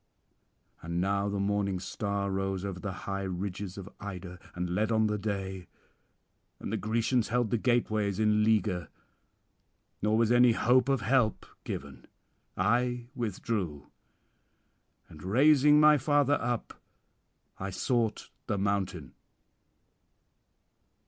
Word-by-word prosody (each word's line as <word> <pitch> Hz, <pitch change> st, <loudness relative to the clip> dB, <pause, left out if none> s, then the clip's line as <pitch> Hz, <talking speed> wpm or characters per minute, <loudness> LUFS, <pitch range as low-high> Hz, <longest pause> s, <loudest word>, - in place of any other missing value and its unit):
And 85 Hz, +1 st, -3 dB
now 100 Hz, +2 st, 0 dB
the 100 Hz, 0 st, -2 dB
morning 100 Hz, -1 st, 0 dB
star 100 Hz, +1 st, -3 dB
rose 95 Hz, 0 st, -2 dB
over 95 Hz, -2 st, -5 dB
the 100 Hz, +1 st, -4 dB
high 100 Hz, 0 st, -2 dB
ridges 95 Hz, +1 st, -4 dB
of 100 Hz, -1 st, -7 dB
Ida, 90 Hz, -3 st, -7 dB, 0.2 s
and 90 Hz, 0 st, -2 dB
led 105 Hz, +5 st, 0 dB
on 110 Hz, -1 st, +3 dB
the 105 Hz, -1 st, -1 dB
day; 95 Hz, -3 st, -4 dB, 0.9 s
and -, -, -5 dB
the -, -, +1 dB
Grecians 115 Hz, +2 st, 0 dB
held 120 Hz, -2 st, 0 dB
the 120 Hz, -, +1 dB
gateways 110 Hz, -5 st, +1 dB
in 105 Hz, 0 st, +3 dB
leaguer, 105 Hz, -6 st, +1 dB, 1.1 s
nor 105 Hz, +1 st, +2 dB
was 115 Hz, 0 st, +2 dB
any 120 Hz, -1 st, +6 dB
hope 125 Hz, +3 st, +3 dB
of 135 Hz, -4 st, +2 dB
help 115 Hz, -1 st, +1 dB, 0.2 s
given. -, -, -7 dB, 0.5 s
I 120 Hz, +4 st, +1 dB
withdrew, 100 Hz, -, -3 dB, 1.2 s
and 75 Hz, -, -13 dB
raising 145 Hz, -, +5 dB
my 150 Hz, -1 st, +6 dB
father 145 Hz, +1 st, +2 dB
up, 120 Hz, -1 st, -3 dB, 0.8 s
I 95 Hz, -, -3 dB
sought 115 Hz, +3 st, -1 dB, 0.2 s
the 100 Hz, -, -1 dB
mountain.' 95 Hz, -7 st, -2 dB
105 Hz, 120 wpm, -29 LUFS, 95-120 Hz, 1.2 s, any